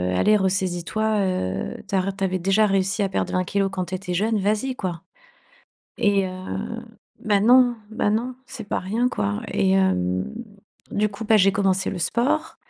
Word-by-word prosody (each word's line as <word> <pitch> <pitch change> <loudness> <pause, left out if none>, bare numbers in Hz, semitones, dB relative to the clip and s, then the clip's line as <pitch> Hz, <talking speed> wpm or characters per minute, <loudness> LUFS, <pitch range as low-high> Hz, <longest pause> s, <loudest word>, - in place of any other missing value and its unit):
allez 210 - +4
ressaisis 185 -2 0
toi, 215 +1 0
heu, 95 - -2
t'arr 195 0 -1
tu 195 - -4
avais 185 -1 0
déjà 195 +4 +3
réussi 195 +1 +1
à 195 - 0
perdre - - -2
20 185 0 +1
kilogrammes 195 +1 0
quand 185 -2 -3
tu 185 - -2
étais 180 -1 -5
jeune, 215 +2 +1
vas-y 215 +6 0
quoi!» 175 -6 -4 1.0
et 200 -2 +2
heu - - -5 0.9
ben, 205 -1 +2
non 245 0 +6
ben, 215 -1 0
non, 240 +4 -1
c'est 225 - -8
pas - - -2
rien 225 +7 0
quoi. 100 - -2
Et 190 -1 +2
hem, 95 - +1 0.6
du 210 +1 +1
coup, 205 +2 -8
bah, 220 0 +4
j'ai 195 -1 +4
commencé 195 -1 +1
le 185 - -5
sport 240 - 0
195 Hz, 180 wpm, -23 LUFS, 185-215 Hz, 1.0 s, non